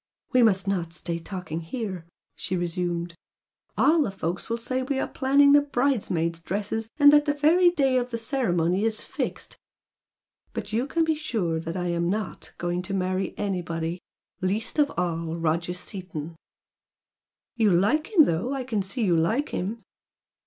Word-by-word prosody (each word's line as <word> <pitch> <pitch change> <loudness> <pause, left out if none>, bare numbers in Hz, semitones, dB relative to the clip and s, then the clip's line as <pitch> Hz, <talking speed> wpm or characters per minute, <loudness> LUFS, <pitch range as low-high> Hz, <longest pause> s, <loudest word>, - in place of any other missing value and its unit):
"We 255 - +5
must 200 -4 +3
not 175 -4 -1
stay 170 -1 -4
talking 175 -2 -5
here" 185 -2 -5 0.3
she 185 - -3
resumed 175 0 -2 0.6
"All 325 +1 +5
the 280 - +1
folks 185 0 -4
will 230 - 0
say 255 +2 -2
we 270 +1 -2
are - - 0
planning 280 +1 +4
the 290 0 +7
bridesmaids' 220 - 0
dresses 210 +5 -2
and 290 -1 +8
that 295 0 +6
the 290 -1 +1
very 335 +5 +5
day 275 -7 +2
of 250 0 -1
the 230 - -3
ceremony 195 - 0
is 220 -1 0
fixed! - - -5 1.0
But 215 -2 -5
you 240 +5 +1
can 330 +3 +1
be 320 0 +2
sure 220 - -2
that 165 +2 -5
I 180 -1 -1
am 170 0 0
not 210 0 -4
going 175 +1 -1
to 195 +2 -4
marry 185 0 -1
anybody 175 -3 -3 0.4
least 205 +10 -1
of 290 -1 +3
all 165 -2 -1
Roger 165 +1 -1
Seaton!" 170 -4 -7 1.2
"You 220 -4 +3
like 215 - +2
him 355 -7 +7
though! 215 - 0
I 265 - -3
can 230 -5 -1
see 200 +6 -2
you 180 -5 +3
like 220 - +1
him!" 215 +6 -4
195 Hz, 165 wpm, -26 LUFS, 175-255 Hz, 1.2 s, and